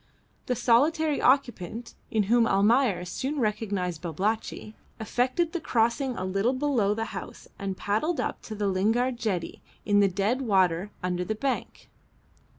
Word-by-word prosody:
The 250 Hz, -, +1 dB
solitary 295 Hz, +7 st, +2 dB
occupant 240 Hz, -4 st, +1 dB, 0.2 s
(in 220 Hz, -3 st, +1 dB
whom 230 Hz, +3 st, +3 dB
Almayer 205 Hz, -1 st, +3 dB
soon 270 Hz, +11 st, -3 dB
recognised 200 Hz, -7 st, -1 dB
Babalatchi) 205 Hz, +5 st, -3 dB, 0.3 s
effected 255 Hz, +9 st, 0 dB
the 345 Hz, -, -2 dB
crossing 240 Hz, +1 st, +1 dB
a 185 Hz, -, -3 dB
little 195 Hz, +6 st, +1 dB
below 255 Hz, -7 st, +1 dB
the 225 Hz, +1 st, -2 dB
house 190 Hz, -, -8 dB
and 195 Hz, -1 st, -3 dB
paddled 300 Hz, +12 st, 0 dB
up -, -, -2 dB
to 215 Hz, -, -6 dB
the 205 Hz, 0 st, -2 dB
Lingard 225 Hz, +7 st, +1 dB
jetty 200 Hz, -8 st, -3 dB, 0.2 s
in 205 Hz, -1 st, +3 dB
the 200 Hz, -, +5 dB
dead 205 Hz, +7 st, 0 dB
water 190 Hz, -5 st, +2 dB
under 180 Hz, 0 st, -1 dB
the 215 Hz, +4 st, -2 dB
bank. 265 Hz, +4 st, -3 dB
220 Hz, 150 wpm, -27 LUFS, 195-255 Hz, 0.3 s, the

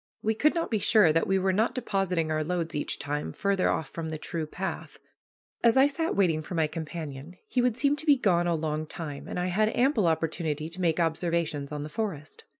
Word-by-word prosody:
We 220 Hz, -, +2 dB
could 295 Hz, +10 st, +2 dB
not 335 Hz, -5 st, -1 dB
be 220 Hz, -, +1 dB
sure 200 Hz, -6 st, +5 dB
that 165 Hz, -, +2 dB
we 195 Hz, -, +2 dB
were 190 Hz, 0 st, +1 dB
not 220 Hz, +5 st, +1 dB
depositing 195 Hz, -9 st, -1 dB
our 155 Hz, 0 st, 0 dB
loads 170 Hz, 0 st, -2 dB
each 150 Hz, -, -2 dB
time 145 Hz, +1 st, -3 dB
farther 200 Hz, -2 st, +1 dB
off 150 Hz, -, -1 dB
from 160 Hz, +2 st, -5 dB
the 160 Hz, -, -4 dB
true 160 Hz, 0 st, -4 dB
path. 190 Hz, +5 st, -5 dB, 0.7 s
As 235 Hz, +1 st, +5 dB
I 265 Hz, -, +7 dB
sat 320 Hz, +3 st, -1 dB
waiting 170 Hz, -6 st, +2 dB
for 165 Hz, +3 st, -7 dB
my 160 Hz, -1 st, +3 dB
companion, 155 Hz, 0 st, -6 dB
he 250 Hz, -, +1 dB
would 245 Hz, -2 st, +1 dB
seem 285 Hz, +1 st, +2 dB
to 315 Hz, -, -5 dB
be 290 Hz, -2 st, +6 dB
gone 175 Hz, -7 st, +2 dB
a 170 Hz, -, +2 dB
long 155 Hz, 0 st, -2 dB
time, 150 Hz, -3 st, -6 dB
and -, -, -4 dB
I 180 Hz, -, 0 dB
had 215 Hz, +3 st, +3 dB
ample 245 Hz, -, +3 dB
opportunity 160 Hz, -1 st, -1 dB
to 175 Hz, +3 st, -6 dB
make 165 Hz, -1 st, +1 dB
observations 165 Hz, -3 st, -1 dB
on 150 Hz, -1 st, -4 dB
the -, -, -5 dB
forest. 155 Hz, -5 st, -5 dB
170 Hz, 225 wpm, -28 LUFS, 155-215 Hz, 0.7 s, I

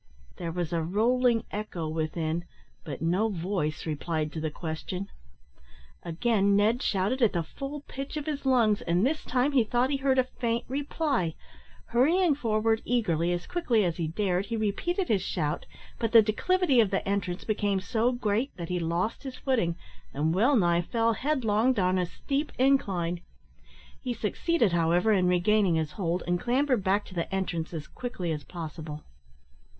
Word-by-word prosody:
There 170 Hz, -1 st, -4 dB
was 175 Hz, -1 st, -3 dB
a 165 Hz, -, +1 dB
rolling 230 Hz, +6 st, +2 dB
echo 200 Hz, -6 st, -4 dB
within, 160 Hz, +1 st, -2 dB, 0.4 s
but 150 Hz, -1 st, -6 dB
no 185 Hz, +7 st, +2 dB
voice 170 Hz, -5 st, -2 dB
replied 155 Hz, 0 st, -2 dB
to 160 Hz, -, -4 dB
the 155 Hz, -, -1 dB
question. 170 Hz, +5 st, -5 dB, 0.9 s
Again 200 Hz, +3 st, +1 dB
Ned 220 Hz, +5 st, +3 dB
shouted 205 Hz, +5 st, 0 dB
at 230 Hz, -, +4 dB
the 170 Hz, -2 st, 0 dB
full 275 Hz, -, -6 dB
pitch 275 Hz, +1 st, -6 dB
of 295 Hz, -, -4 dB
his 295 Hz, -2 st, -3 dB
lungs, 235 Hz, -6 st, +3 dB
and 175 Hz, +5 st, +1 dB
this 305 Hz, +3 st, 0 dB
time 260 Hz, +3 st, +1 dB
he 265 Hz, -4 st, +4 dB
thought 245 Hz, +4 st, +1 dB
he 280 Hz, -, +1 dB
heard 270 Hz, -1 st, +1 dB
a 260 Hz, -, +5 dB
faint 235 Hz, -2 st, -2 dB
reply. 275 Hz, -, -1 dB, 0.5 s
Hurrying 320 Hz, +7 st, +3 dB
forward 225 Hz, -4 st, +1 dB
eagerly, 175 Hz, -9 st, +1 dB
as 175 Hz, 0 st, -2 dB
quickly 240 Hz, -, +1 dB
as 170 Hz, -2 st, -1 dB
he 165 Hz, -2 st, -1 dB
dared, 185 Hz, +2 st, -1 dB
he 230 Hz, -, -2 dB
repeated 345 Hz, -, -1 dB
his 205 Hz, -4 st, +2 dB
shout, 155 Hz, -5 st, -2 dB, 0.3 s
but 230 Hz, -1 st, -1 dB
the 225 Hz, -1 st, +9 dB
declivity 285 Hz, -, +2 dB
of 220 Hz, -4 st, +4 dB
the 195 Hz, 0 st, -1 dB
entrance 195 Hz, -2 st, -1 dB
became 205 Hz, -2 st, 0 dB
so 225 Hz, +5 st, +1 dB
great 240 Hz, +1 st, 0 dB
that 170 Hz, -2 st, -6 dB
he 180 Hz, 0 st, 0 dB
lost 170 Hz, +6 st, -1 dB
his 265 Hz, -2 st, -7 dB
footing 225 Hz, -11 st, 0 dB, 0.4 s
and 155 Hz, +3 st, +1 dB
well 235 Hz, +10 st, +4 dB
nigh 175 Hz, -5 st, +3 dB
fell 230 Hz, +5 st, +1 dB
headlong 245 Hz, -2 st, +1 dB
down 185 Hz, -4 st, +1 dB
a 180 Hz, -, 0 dB
steep 280 Hz, -, -3 dB
incline. 190 Hz, -11 st, +1 dB, 0.8 s
He 250 Hz, -3 st, -3 dB
succeeded, 230 Hz, -, +1 dB
however, 175 Hz, +5 st, +3 dB
in 185 Hz, -3 st, +3 dB
regaining 180 Hz, +1 st, +3 dB
his 160 Hz, -2 st, -1 dB
hold, 175 Hz, -2 st, -2 dB
and 175 Hz, 0 st, 0 dB
clambered 255 Hz, -1 st, +1 dB
back 195 Hz, +2 st, +1 dB
to -, -, -12 dB
the 170 Hz, 0 st, -3 dB
entrance 180 Hz, -4 st, -2 dB
as 160 Hz, -3 st, -5 dB
quickly 215 Hz, -9 st, -4 dB
as 150 Hz, -2 st, -3 dB
possible. 155 Hz, -2 st, -7 dB
205 Hz, 170 wpm, -28 LUFS, 170-245 Hz, 0.9 s, the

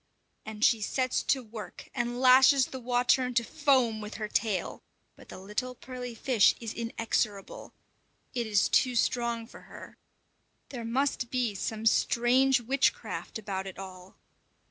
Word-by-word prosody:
_ -, -, -46 dB, 0.5 s
And 215 Hz, +1 st, 0 dB
she 225 Hz, -2 st, +3 dB
sets 255 Hz, +4 st, 0 dB
to 265 Hz, -2 st, 0 dB
work 220 Hz, -1 st, -10 dB
and 240 Hz, -1 st, -2 dB
lashes 260 Hz, +1 st, +6 dB
the 260 Hz, -, -8 dB
water 245 Hz, +1 st, +2 dB
into 250 Hz, -1 st, 0 dB
foam 255 Hz, -6 st, +1 dB
with 210 Hz, +1 st, -7 dB
her 215 Hz, -1 st, -4 dB
tail; 210 Hz, -3 st, -2 dB, 0.3 s
but -, -, -17 dB
the -, -, -9 dB
little 210 Hz, +7 st, -4 dB
pearly 250 Hz, -1 st, -8 dB
fish 230 Hz, -3 st, +3 dB
is 225 Hz, -2 st, -6 dB
inexorable; 225 Hz, -3 st, -3 dB, 0.6 s
it 240 Hz, -3 st, -2 dB
is 210 Hz, -1 st, +2 dB
too 250 Hz, -2 st, +2 dB
strong 235 Hz, -1 st, 0 dB
for 225 Hz, -, -14 dB
her. -, -, -12 dB, 0.7 s
There 240 Hz, -4 st, -6 dB
must 255 Hz, 0 st, -1 dB
be 245 Hz, -4 st, -1 dB
some 215 Hz, +3 st, -4 dB
strange 245 Hz, +4 st, +3 dB
witchcraft 260 Hz, 0 st, -1 dB
about 195 Hz, -3 st, -5 dB
it 190 Hz, -, -9 dB
all! 185 Hz, -1 st, -10 dB
235 Hz, 150 wpm, -29 LUFS, 215-255 Hz, 0.7 s, lashes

